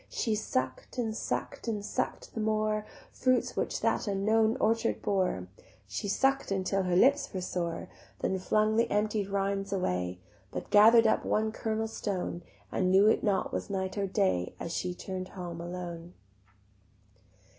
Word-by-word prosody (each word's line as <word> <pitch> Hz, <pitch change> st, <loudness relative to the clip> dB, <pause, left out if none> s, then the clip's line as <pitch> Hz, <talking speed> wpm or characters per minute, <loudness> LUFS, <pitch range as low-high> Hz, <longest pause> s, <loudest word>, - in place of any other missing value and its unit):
She 225 Hz, -, -1 dB
suck'd 130 Hz, -, -2 dB
and 225 Hz, -3 st, -1 dB
suck'd 230 Hz, -, -3 dB
and 210 Hz, -3 st, -2 dB
suck'd -, -, -3 dB
the -, -, -4 dB
more 215 Hz, 0 st, 0 dB, 0.2 s
Fruits 255 Hz, -1 st, +1 dB
which -, -, -1 dB
that -, -, +1 dB
unknown 220 Hz, +4 st, +2 dB
orchard 225 Hz, +1 st, +1 dB
bore; 185 Hz, -, 0 dB, 0.4 s
She 205 Hz, -, -4 dB
suck'd 270 Hz, +4 st, +1 dB
until 195 Hz, 0 st, +1 dB
her 180 Hz, -1 st, 0 dB
lips 275 Hz, +9 st, +4 dB
were 185 Hz, -, -3 dB
sore; 170 Hz, -2 st, -3 dB, 0.3 s
Then 190 Hz, -, -1 dB
flung 215 Hz, +3 st, +2 dB
the 230 Hz, -, +3 dB
emptied 210 Hz, -1 st, +1 dB
rinds 195 Hz, 0 st, -1 dB
away 90 Hz, -, -1 dB, 0.3 s
But -, -, -6 dB
gather'd 225 Hz, +3 st, +8 dB
up 220 Hz, -, +3 dB
one 220 Hz, +1 st, +1 dB
kernel 220 Hz, 0 st, -2 dB
stone, 190 Hz, -5 st, -3 dB, 0.3 s
And 185 Hz, -, +1 dB
knew 200 Hz, +3 st, +6 dB
not 200 Hz, -3 st, 0 dB
was -, -, -2 dB
it -, -, -4 dB
night 190 Hz, -1 st, -2 dB
or 200 Hz, -1 st, 0 dB
day 90 Hz, -, 0 dB
As 170 Hz, -, -4 dB
she 180 Hz, -1 st, -2 dB
turn'd 185 Hz, 0 st, -5 dB
home 175 Hz, -3 st, -7 dB
alone. 175 Hz, -1 st, -6 dB
200 Hz, 155 wpm, -30 LUFS, 180-220 Hz, 0.4 s, gather'd